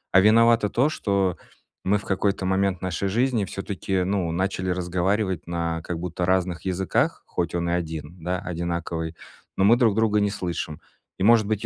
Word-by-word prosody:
"А 95 - +8
виновато 115 +1 +5
то, 130 +7 +2
что 100 - 0 0.5
мы 100 +2 +2
в 100 - -9
какой-то 95 0 0
момент 95 -1 +1
нашей 95 +1 -2
жизни 120 +1 +1
всё-таки, 95 -1 -2
ну, 95 -3 0
начали 95 +1 -1
разговаривать 90 +1 0
на 85 -1 -2
как 85 -1 -4
будто 90 0 -3
разных 90 -2 +1
языках, 95 0 0
хоть 85 -2 -2
он 85 0 -1
и - - +1
один, 80 -1 -4
да, 90 +1 -1
одинаковый, 85 -1 -3 0.4
но 95 - +3
мы 115 +4 +7
друг 115 -4 +4
друга 105 -1 +2
не 100 - +2
слышим". 85 -6 -4 0.4
И - - 0
может 115 0 +6
быть, 110 -1 -1
95 Hz, 175 wpm, -24 LUFS, 85-100 Hz, 0.5 s, А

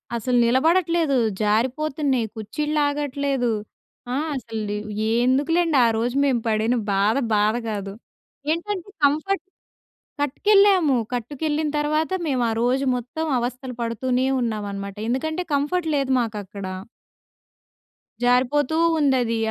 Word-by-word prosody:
అసలు 245 +2 0
నిలబడట్లేదు. 320 +3 +2 0.2
జారిపోతున్నాయి. 260 +4 +1
కుచ్చిల్లాగట్లేదు. 285 0 -1 0.6
ఆ! - - 0 0.2
అసలు 225 -4 -5 0.6
ఎందుకులెండి, 295 +5 +2
ఆ - - +5
రోజు 240 +3 -1
మేము 255 -4 +1
పడిన 220 +2 +1 0.2
బాధ 200 +4 +2 0.2
బాధ 210 +2 +2
కాదు. 200 -2 -4 0.6
ఏంటంటే 365 +3 -3 0.2
కంఫర్ట్ 320 +6 0 0.8
కట్టుకెళ్ళాము. 375 0 +4 0.2
కట్టుకెళ్ళిన 295 +5 -2
తర్వాత 305 +3 0 0.2
మేము 260 -4 +1
ఆ - - 0
రోజు 260 +3 +1
మొత్తం 250 +7 -4
అవస్థలు 250 +2 -4
పడుతూనే 250 +2 0 0.2
ఉన్నాం 215 -3 -2
అనమాట. 200 0 -6
ఎందుకంటే 315 +8 -1
కంఫర్ట్ 320 +4 0
లేదు 275 -2 0
మాకు 225 -3 -2
అక్కడ. 200 +1 -9 1.6
జారిపోతూ 255 +4 +2 0.3
ఉందది. 255 -5 +2
265 Hz, 105 wpm, -23 LUFS, 235-305 Hz, 1.6 s, ఆ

